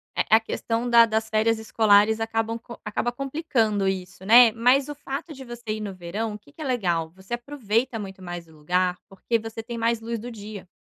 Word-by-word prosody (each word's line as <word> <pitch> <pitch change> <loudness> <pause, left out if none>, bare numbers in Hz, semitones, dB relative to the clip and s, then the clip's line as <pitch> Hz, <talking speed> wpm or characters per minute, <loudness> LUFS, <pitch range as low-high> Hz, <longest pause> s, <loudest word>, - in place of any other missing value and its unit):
A 220 - +4
a - - +1
questão 230 +1 -2
da 235 -1 +8
das 220 0 -1
férias 220 +1 +2
escolares 220 0 +4
acabam 225 0 -1 0.2
acaba 220 +3 -1
complicando 245 -7 0
isso, 185 0 -4
né. 235 +2 +8
Mas 250 +5 +3
o 295 - -5
fato 290 +3 -6
de 265 -1 -10
você 240 -1 -10
ir 215 - -5
no 200 -2 -4
verão, 200 +5 -4
o 210 - -8
que 285 - -21
que 310 - -13
é - - -4
legal? 175 -10 0
Você 190 +5 -10
aproveita 240 -2 -1
muito 190 -2 -8
mais 175 -1 -7
o 160 - -19
lugar, 180 +4 0
porque 210 +4 -1
você 225 0 -7
tem 235 0 -6
mais 230 0 0
luz 230 0 -4
do 240 +3 -7
dia. 205 -3 -9
225 Hz, 210 wpm, -25 LUFS, 200-240 Hz, 0.2 s, da